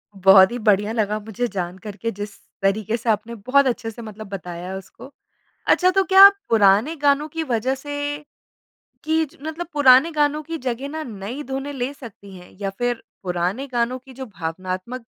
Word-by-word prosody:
बहुत 190 +1 +7
ही 245 - -3
बढ़िया 210 0 +2
लगा 215 -2 -1
मुझे 220 +3 -3
जानकर 190 +1 -6
के 230 0 -3
जिस 205 +1 -7 0.3
तरीके 215 +3 0
से 230 0 -4
आपने 220 +2 -1
बहुत 255 +6 +2
अच्छे 235 -2 -2
से 235 - -11
मतलब 215 -1 -9
बताया 180 -1 -6
उसको। 195 +8 -12 0.6
अच्छा 365 0 +4
तो 385 +1 +3
क्या 385 +1 +9 0.2
पुराने 220 +8 +4
गानों 285 0 +2
की 325 +1 -3
वज़ह 255 0 -1
से 290 +2 -7 1.1
कि 320 +1 +2 0.2
मतलब 320 +2 -5
पुराने 285 +2 +6
गानों 300 0 +1
की 330 +1 -6
जगह 255 +1 -4
ना 315 +1 -5
नई 225 +5 -6
धुनें 270 +2 -4
ले 260 +1 -3
सकती 210 -7 -12
हैं? 180 0 -14
या 195 -1 -2
फिर 245 -1 -1 0.2
पुराने 180 +8 -2
गानों 240 +2 0
की 260 +1 -16
जो 260 +1 -8
भावनात्मक 185 +6 -5
235 Hz, 175 wpm, -22 LUFS, 200-280 Hz, 1.1 s, क्या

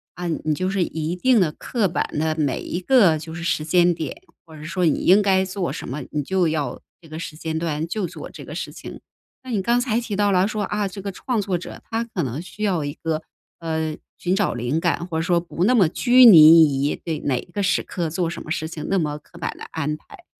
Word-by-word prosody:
啊， 175 0 -4
你 155 -2 -1
就 185 +4 -1
是 195 -1 0
一 160 0 -3
定 245 +6 +3
地 175 -5 +2
刻 215 +6 -1
板 175 - -1
地 155 +1 0
每 145 -5 -1
一 175 - -4
个 185 -6 +4
就 160 +1 -8
是 170 - -6
时 165 -2 0
间 175 +2 +3
点， 165 - -6 0.2
或 160 -2 -15
者 150 - -10
说 180 +3 -1
你 155 - +1
应 195 +4 +6
该 190 -2 +3
做 185 -1 -3
什 - - -6
么， 140 +4 -4
你 150 -1 -1
就 185 +3 +1
要 155 -2 -2 0.2
这 165 - -16
个 155 - -7
时 165 -2 -7
间 160 0 -4
段 160 -2 -2
就 205 +2 -2
做 - - -8
这 - - -11
个 - - -8
事 - - -5
情。 - - -10 0.4
那 260 - -10
你 225 -5 0
刚 235 +5 +2
才 235 -3 0
提 230 -4 -4
到 205 0 +2
了 185 0 +3
说 215 -1 -2
啊， 205 0 -1
这 195 +1 -8
个 200 - -4
创 230 +3 -2
作 190 -3 -1
者 175 - -9
他 225 0 -1
可 225 -6 -4
能 130 -1 -3
需 200 - -12
要 180 -8 0
一 145 - -4
个， 160 0 -3 0.4
呃， 160 -2 -2 0.2
寻 180 +1 0
找 200 -2 +1
灵 120 +6 -1
感， 170 0 -1
或 165 -3 -3
者 - - 0
说 175 0 +2
不 170 0 -3
那 230 +6 +4
么 195 -10 +4
拘 250 +7 +5
泥 155 - +8
于 - - -2
对 160 -2 -4
哪 130 -3 0
个 205 - -5
时 195 - +2
刻 175 -3 -4
做 170 +1 -1
什 170 - -6
么 155 - -8
事 160 - -2
情， 160 -2 -7
那 195 - +1
么 150 -3 -2
刻 170 +3 -16
板 - - -2
的 - - -10
安 150 -1 -2
排。 355 - -17
175 Hz, 275 characters per minute, -22 LUFS, 155-200 Hz, 0.4 s, 泥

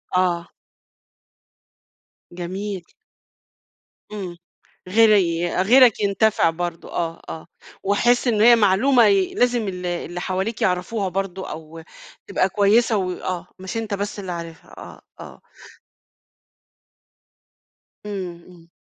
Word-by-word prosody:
آه. 175 -2 +1 1.8
جميل. 185 +2 -5 1.3
إمم 185 -4 -6 0.5
.غيري 190 -5 +4
غيرك 245 +3 +6
ينتفع 200 -2 +2
برضه 170 0 -5
آه، 165 -1 -3
آه. 160 - -8 0.4
ويحس 240 +6 +2
إن 220 -3 +2
هي 235 +2 +8
معلومة 230 +4 +4
ي 195 -3 +2
لازم 245 -3 +1
ال 180 -1 -5
اللي 175 0 -4
حواليك 190 +5 -3
يعرفوها 190 +2 0
برضه 190 0 -4
أو 160 +1 -9 0.4
تبقى 185 - +1
كويسة 215 +3 +3
وآه. 185 -1 -3
مش 190 +4 -6
أنت 225 -2 -3
بس 205 +1 -3
اللي 190 -2 -5
عارفها 170 -1 -8
آه، - - -11 0.2
آه. - - -11 2.6
إمم، 185 -4 -6
إمم. 175 -2 -17
190 Hz, 105 wpm, -22 LUFS, 175-210 Hz, 2.6 s, هي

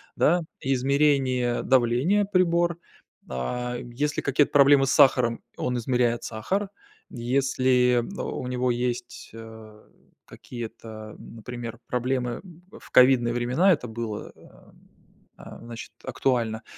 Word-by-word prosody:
да, 175 +2 +3 0.2
измерение 135 -2 +1
давления 130 - +2
прибор, 175 -3 +1 0.5
а, 120 - -3
если 140 +5 -3
какие-то 140 +1 +2
проблемы 140 -1 +6
с 130 - 0
сахаром, 120 -3 +4 0.2
он 125 - -2
измеряет 120 -1 0
сахар. 190 - -3 0.4
Если, 125 -1 +1
о, - - -3 0.2
у - - -5
него 125 0 -1
есть, 120 0 -3
э, 110 -1 -12 0.4
какие-то, 110 -2 -9
например, 115 0 -8
проблемы, 125 0 -2 0.4
в - - -17
ковидные 125 -2 +5
времена 125 +11 +2
это 125 - -4
было, 110 -2 -6
э, - - -18 0.9
а, - - -11
значит, 115 0 -9
актуально, 115 -4 -1
125 Hz, 110 wpm, -25 LUFS, 120-135 Hz, 0.9 s, проблемы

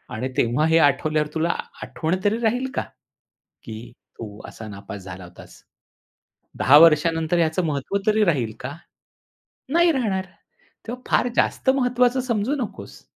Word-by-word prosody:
आणि 125 +4 -3
तेव्हा 125 +3 +2
हे 160 0 +4
आठवल्यावर 150 +1 +2
तुला 160 +1 0 0.3
आठवण 160 +2 -2
तरी 205 +2 +2
राहील 245 +3 0
का? - - 0 0.8
की 115 +1 -9 0.3
तू 105 -2 -8
असा 110 - -10
नापास 100 0 -9
झाला 95 0 -9
होतास. 90 - -15 1.0
10 145 - +7
वर्षानंतर 165 +1 +4
याचं 165 +2 +1
महत्व 150 +5 -2
तरी 215 0 +4
राहील 130 - 0
का? 140 +3 -6 1.0
नाही 340 0 +5
राहणार! 210 -10 -1 0.6
तेव्हा 250 +2 -6
फार - - +3
जास्त - - +1
महत्वाचं 250 0 +2
समजू 240 +1 -1
नकोस." 220 - -10
160 Hz, 135 wpm, -23 LUFS, -, 1.0 s, 10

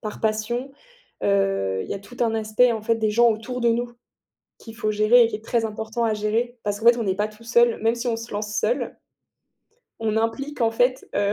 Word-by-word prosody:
par 215 -2 -6
passion, 225 +5 -1 0.5
heu, 195 - +1
il - - -12
y - - -3
a - - -5
tout 205 +5 -14
un 230 -2 +2
aspect, 220 +3 +3
en 225 - -3
fait, 230 +1 +2
des 220 -1 0
gens 235 +2 +5
autour 230 +3 -3
de 235 - +3
nous, 240 +1 0 0.7
qu'il 225 -1 -12
faut 215 -2 -2
gérer 215 +4 +5
et - - +3
qui 225 - -4
est 215 +1 -11
très 230 -1 0
important 220 +2 -3
à 220 -1 +1
gérer, 225 +4 -1
parce 205 -1 -2
qu'en 225 - +1
fait, 235 0 +7
on 235 - -1
n'est 190 -2 0
pas 210 +2 0
tout 215 +1 -16
seul, 235 0 +3
même 225 +1 +3
si 240 +1 -4
on 230 -1 0
se 230 +1 -8
lance 210 0 -4
seul - - -1 1.0
on 220 -1 -1
implique 260 +6 -2
en 230 -1 +3
fait, 245 +3 0
heu, 205 0 +1
225 Hz, 240 wpm, -23 LUFS, 215-240 Hz, 1.0 s, fait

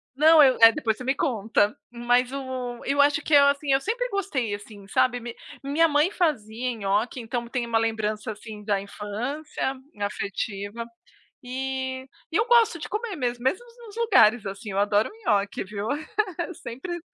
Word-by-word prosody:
não 310 +1 +7
eu 260 -2 +5
é, 225 0 +10
depois 225 -6 -1
você 255 - -8
me 265 +2 0
conta, 220 -5 +1 0.2
mas 245 +1 +1
o 255 -3 -5
eu 285 +1 +3
acho 290 +2 +3
que 310 - -3
é 285 - +9
assim, 280 0 +3
eu 270 0 +3
sempre - - -1
gostei, 290 - -2
assim, 205 -1 -12
sabe 245 +3 +2
mi 240 0 -8 0.3
minha 305 +4 +3
mãe 295 +4 +3
fazia 250 - -1
nhoque, 210 +4 -1
então 235 0 -4
tem 240 0 -2
uma 230 -1 +1
lembrança, 220 -1 -2
assim, 215 0 -10
da 200 -2 0
infância 245 +9 -4 0.3
afetiva 205 +2 -4 0.6
e 260 +1 -4 0.3
e - - 0
eu 440 +3 +2
gosto 460 -6 +4
de 310 - -7
comer 425 -2 -3
mesmo. 245 -2 -3
Mesmo 370 - 0 0.2
nos 420 +1 -13
lugares, 245 - +4
assim, 200 +2 -6
eu 195 - -2
adoro 205 +1 +2
um 445 -2 -11
nhoque, 200 -1 +1
viu. 205 +2 -5 0.8
Sempre 345 +9 -6
245 Hz, 170 wpm, -25 LUFS, 215-290 Hz, 0.8 s, é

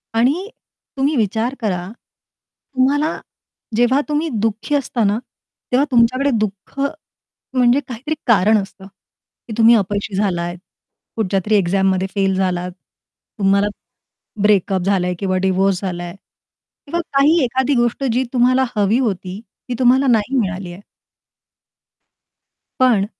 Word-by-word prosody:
आणि 295 - +1 0.5
तुम्ही 280 +3 +1
विचार 225 +3 0
करा. 180 -5 -2 0.9
तुम्हाला 290 +4 +2 0.6
जेव्हा 245 +4 +3
तुम्ही 300 +2 0
दुःखी 225 +6 -1
असता 255 -5 -1
ना, 205 +2 +2 0.5
तेव्हा 265 +3 +3
तुमच्याकडे 255 +3 +3
दुःख 210 +5 -4 0.7
म्हणजे 250 +1 +4
काहीतरी 265 +6 -4
कारण 215 0 +4
असतं, 195 0 -11 0.6
की 225 - -6
तुम्ही 230 +1 +6
अपयशी 205 -1 -1
झालात, 175 -3 -1 0.6
कुठच्यातरी 210 0 0
एक्झाममध्ये 190 0 +1
फेल 195 -1 +1
झालात, 180 -1 -1 0.7
तुम्हाला 200 +1 +3 0.7
ब्रेकअप 195 -2 +2
झालाय 185 -2 +1
किंवा 185 -1 0
डिव्होर्स 190 0 +1
झालाय 175 -1 -5 0.7
किंवा 340 +4 -2
काही 285 +5 +4
एखादी 260 +3 0
गोष्ट 240 +2 0
जी 255 +2 +1
तुम्हाला 255 +1 +3
हवी 210 +4 +2
होती, 195 -5 -2 0.3
ती 245 - -1
तुम्हाला 260 +2 +4
नाही 240 +2 +2
मिळाली 190 -3 -3
आहे. 190 - -12 2.0
पण 235 -6 +4
215 Hz, 115 wpm, -19 LUFS, 195-255 Hz, 2.0 s, तुम्ही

